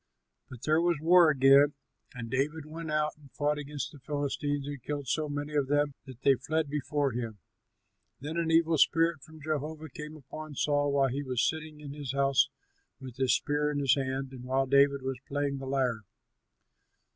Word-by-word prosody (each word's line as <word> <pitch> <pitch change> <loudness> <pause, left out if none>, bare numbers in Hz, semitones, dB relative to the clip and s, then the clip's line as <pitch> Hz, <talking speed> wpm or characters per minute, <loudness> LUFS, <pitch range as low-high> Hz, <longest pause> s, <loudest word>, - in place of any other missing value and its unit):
But 125 0 -11
there 155 +1 +3
was 170 -3 +1
war 170 +1 +6
again, 140 0 +5 0.4
and 115 -2 -6
David 145 +4 -1
went 160 +1 -7
out 150 0 0
and 145 -3 -18
fought 150 0 0
against 145 -1 -5
the 145 - -13
Philistines 145 0 -2
and 145 -2 -6
killed 145 +1 -4
so 150 +4 -1
many 145 +1 -4
of 145 -2 +1
them 145 0 +1
that 130 -1 -12
they 140 - +6
fled 150 +3 -2
before 145 -1 0
him. 115 -2 -4 0.8
Then 150 +4 -5
an 170 -1 0
evil 165 -1 +3
spirit 165 0 +3
from 160 +3 -14
Jehovah 155 +1 -3
came 150 +3 -8
upon 155 +2 -9
Saul 145 +1 +1
while 135 -1 +3
he 135 +3 -2
was 130 -3 0
sitting 155 -1 -5
in 140 -2 -7
his 145 -3 -5
house 135 0 +3 0.5
with 130 -2 -10
his 130 -1 +3
spear 150 0 0
in 150 - -2
his 135 -3 +3
hand 135 -1 -2
and 130 -2 -9
while 130 +1 +1
David 140 0 +4
was 130 -1 -3
playing 145 0 -1
on 135 - -5
the 135 - -7
lyre. 130 -4 0
145 Hz, 190 wpm, -30 LUFS, 135-150 Hz, 0.8 s, war